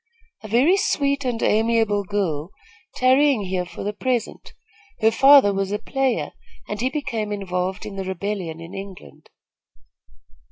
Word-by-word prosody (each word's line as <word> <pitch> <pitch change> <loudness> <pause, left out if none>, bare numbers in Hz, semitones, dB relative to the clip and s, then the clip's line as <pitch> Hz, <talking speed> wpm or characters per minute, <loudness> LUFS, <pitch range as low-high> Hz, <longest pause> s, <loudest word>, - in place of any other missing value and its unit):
"A 215 - -9
very 260 - +3
sweet 280 -6 0
and 240 -2 -2
amiable 220 -2 +2
girl 180 -6 -2 0.5
tarrying 260 -2 +3
here 185 -1 -2
for 175 - -8
the 205 +1 -3
present. 245 +1 -3 0.4
Her 220 +1 +4
father 270 -4 +6
was 195 0 -2
a 205 - 0
player, 270 +2 -1 0.4
and 210 +1 -4
he 255 - +1
became 230 -8 -3
involved 185 -1 -3
in 200 -2 -8
the 195 - -3
rebellion 190 -3 -4
in 165 +3 -10
England." 195 - -10
210 Hz, 145 wpm, -22 LUFS, 190-255 Hz, 0.5 s, father